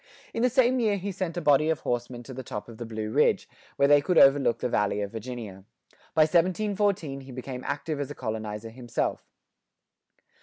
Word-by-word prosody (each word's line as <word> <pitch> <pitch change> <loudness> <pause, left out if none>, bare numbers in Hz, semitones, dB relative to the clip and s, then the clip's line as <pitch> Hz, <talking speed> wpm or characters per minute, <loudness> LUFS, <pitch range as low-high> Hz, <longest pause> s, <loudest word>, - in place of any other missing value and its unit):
In 230 - -2
the 250 - +4
same 255 0 +3
year 215 -4 +2
he 200 +1 -4
sent 180 -2 -4
a - - -1
body 150 0 +4
of 160 - 0
horsemen 120 0 -3
to 130 - -9
the 130 - -6
top 105 -4 -6
of 115 -2 -11
the 120 - -5
Blue 110 -1 -4
Ridge, - - +2 0.3
where 140 - +4
they 145 0 +6
could 175 +4 0
overlook 135 -4 +6
the - - -2
Valley 105 -3 0
of 100 -1 -3
Virginia.[90:1] 110 -4 -7 0.5
By 160 - +5
1714 180 -2 +1
he 135 0 -11
became 130 0 -6
active 145 +1 -3
as 145 - -3
a - - -7
colonizer 110 -1 -5
himself. 120 -1 -3
135 Hz, 195 wpm, -27 LUFS, 115-175 Hz, 0.5 s, they